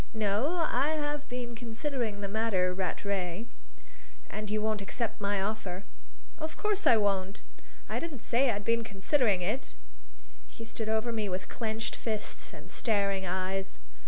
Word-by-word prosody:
"No, 225 - +2
I 280 +5 +3
have 295 0 -2
been 245 -1 -3
considering 235 -2 -2
the 200 - -1
matter, 200 -4 +2
Rattray." 190 +1 -1 0.9
"And 210 0 -3
you 215 +1 +2
won't 215 -1 +1
accept 215 +3 -2
my 200 0 +2
offer?" 195 -2 -2 0.6
"Of 315 0 -4
course 420 -1 +2
I 230 - +8
won't. 195 -1 +1 0.4
I - - 0
didn't 310 -8 -5
say 250 +3 +4
I'd 205 -2 -1
been 230 0 +3
considering 210 0 +2
that." 215 +10 -1 0.7
He 230 - -9
stood 220 -1 -3
over 220 +2 +2
me 215 -3 0
with 185 0 -3
clenched 225 0 -2
fists 215 -2 -3
and - - -10
starting 200 -4 +1
eyes. 190 +1 -1
215 Hz, 150 wpm, -31 LUFS, 200-240 Hz, 0.9 s, I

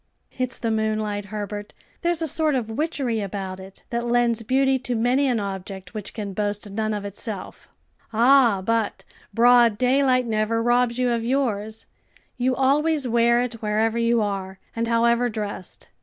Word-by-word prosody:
"It's 255 0 -2
the 230 -1 -2
moonlight, 215 -2 -1
Herbert; 205 0 -6 0.3
there's 340 -2 0
a - - 0
sort 310 0 +1
of 225 -4 -2
witchery 260 -4 -1
about 195 -1 -5
it, 190 +1 -12
that 235 0 -1
lends 235 -1 +2
beauty 265 +3 +2
to 250 -1 -3
many 250 +5 +2
an 245 -3 +1
object 190 -2 -6
which 210 -2 -6
can 205 -3 -5
boast 205 0 -3
none 215 +1 -1
of 205 -1 -5
itself." 200 0 -7 0.4
"Ah, 235 -3 +4
but 225 -1 0 0.3
broad 235 0 +5
daylight 255 0 +3
never 225 0 0
robs 240 0 +2
you 250 -1 +1
of 230 -1 -1
yours; 225 -4 -1 0.5
you 255 +1 0
always 285 +2 +2
wear 235 +1 +3
it 235 -2 -6
wherever 220 +2 0
you 230 -1 +2
are, 195 -2 -4 0.2
and 230 0 -1
however 235 +1 +2
dressed. 210 -4 -6
230 Hz, 160 wpm, -23 LUFS, 210-250 Hz, 0.5 s, broad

